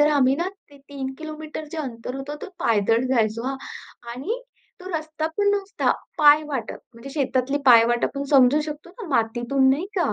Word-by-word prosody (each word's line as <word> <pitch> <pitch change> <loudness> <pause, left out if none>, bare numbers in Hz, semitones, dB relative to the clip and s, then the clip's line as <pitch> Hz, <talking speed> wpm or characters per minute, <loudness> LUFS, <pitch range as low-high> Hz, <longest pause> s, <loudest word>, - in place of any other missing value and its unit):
तर 295 - +6
आम्ही 270 -2 +4
ना 345 +4 -1 0.2
ते 285 - -16
3 270 -2 -5
किलोमीटरचे 310 0 -7
अंतर 250 -3 -5
होत 270 +2 -6
तो - - -6
पायदळ 225 -2 +2
जायचो 230 -2 +1
हा, 270 - -2 0.5
आणि 400 - -4 0.4
तो 370 - -8
रस्ता 315 -1 -3
पण 410 0 +2
नुसता 400 -1 0 0.3
पायवाटप 295 -3 +4 0.2
म्हणजे 235 +4 -10
शेतातली 270 -1 0
पायवाटप 240 +2 +5
समजू 275 +1 +5
शकतो 305 +3 -7
ना, 390 +2 -9
मातीतून 240 +1 +1
नाही 305 +8 0
का? 350 - +1
280 Hz, 160 wpm, -23 LUFS, 250-310 Hz, 0.5 s, तर